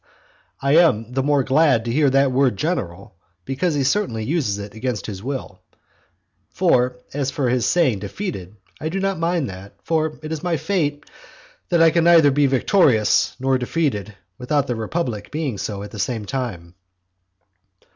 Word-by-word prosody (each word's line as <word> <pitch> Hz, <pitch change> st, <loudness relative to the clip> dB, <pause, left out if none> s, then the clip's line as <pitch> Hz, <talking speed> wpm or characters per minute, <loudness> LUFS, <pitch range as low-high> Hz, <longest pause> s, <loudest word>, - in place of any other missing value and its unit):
I 140 Hz, +3 st, +3 dB
am 120 Hz, -10 st, +3 dB
the 135 Hz, -, +1 dB
more 145 Hz, 0 st, +2 dB
glad 135 Hz, -3 st, +3 dB
to 115 Hz, -, -2 dB
hear 145 Hz, +2 st, +3 dB
that 135 Hz, 0 st, +3 dB
word 130 Hz, -5 st, +2 dB
"general," 100 Hz, -, -3 dB, 0.3 s
because 150 Hz, +5 st, -1 dB
he 140 Hz, -, +1 dB
certainly 140 Hz, -, 0 dB
uses 130 Hz, -7 st, -1 dB
it 100 Hz, 0 st, -8 dB
against 110 Hz, -2 st, -3 dB
his 100 Hz, -3 st, -6 dB
will, 125 Hz, -6 st, -5 dB, 0.9 s
for 125 Hz, 0 st, +1 dB, 0.2 s
as 140 Hz, -1 st, -1 dB
for 135 Hz, -2 st, -1 dB
his 125 Hz, -1 st, +1 dB
saying 135 Hz, -, +2 dB
"defeated," 100 Hz, -, -6 dB, 0.2 s
I 155 Hz, -, -3 dB
do 190 Hz, +4 st, -3 dB
not 195 Hz, -2 st, -1 dB
mind 165 Hz, -3 st, 0 dB
that, 95 Hz, +2 st, -11 dB
for 160 Hz, -1 st, -1 dB
it 155 Hz, -, -6 dB
is 160 Hz, -2 st, -3 dB
my 175 Hz, -2 st, 0 dB
fate 150 Hz, -3 st, -1 dB, 0.7 s
that 170 Hz, -1 st, +4 dB
I 165 Hz, -, +6 dB
can 170 Hz, +1 st, +2 dB
neither 165 Hz, -4 st, +6 dB
be 145 Hz, +1 st, +3 dB
victorious 130 Hz, -, +3 dB
nor 130 Hz, 0 st, +1 dB
defeated 120 Hz, -, -2 dB, 0.2 s
without 140 Hz, +3 st, 0 dB
the 125 Hz, -, -2 dB
republic 110 Hz, -2 st, -3 dB
being 145 Hz, -9 st, -3 dB
so 100 Hz, -2 st, -4 dB
at 105 Hz, -, -9 dB
the 105 Hz, -, -8 dB
same 110 Hz, 0 st, -2 dB
time. 100 Hz, -10 st, -5 dB
135 Hz, 170 wpm, -21 LUFS, 110-160 Hz, 0.9 s, I